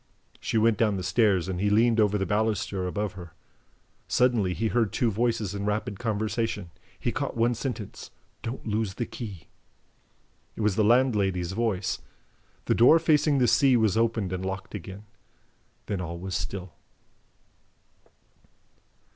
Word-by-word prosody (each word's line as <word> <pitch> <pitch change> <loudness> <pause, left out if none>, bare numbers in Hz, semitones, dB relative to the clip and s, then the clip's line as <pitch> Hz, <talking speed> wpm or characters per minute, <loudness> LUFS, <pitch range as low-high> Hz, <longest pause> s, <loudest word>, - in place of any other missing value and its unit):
She - - -1
went 110 0 +3
down 105 -4 +2
the 95 - -4
stairs 95 -1 +2
and 95 -1 -3
he 105 - +2
leaned 115 +2 +3
over 105 -1 +3
the 95 - -1
baluster 105 -3 -1
above 100 +2 -2
her. 85 -4 -10 0.7
Suddenly 115 -8 +2
he 110 0 0
heard 115 -3 +1
two 120 -3 +1
voices 110 -2 0
in 100 0 -4
rapid 105 -1 -2
conversation. 110 -4 -2 0.3
He - - -1
caught - - -3
one 120 +1 +3
sentence: 115 -4 -5 0.3
"Don't 115 +4 -6
lose 105 -3 -1
the 120 - -2
key." 105 -9 -8 1.1
It - - -5
was 105 -3 +2
the 110 - +3
landlady's 105 -7 +2
voice. 100 -3 -1 0.7
The - - +2
door 125 +8 +7
facing 155 -3 +3
the 125 -2 +3
sea 130 +2 +4
was 110 -4 +2
opened 110 -4 0
and 95 0 -3
locked 95 +1 -5
again. 95 +1 -8 0.8
Then 100 -3 -3
all 85 -1 -5
was 95 +2 -6
still. 95 -3 -4
105 Hz, 150 wpm, -27 LUFS, 95-115 Hz, 1.1 s, door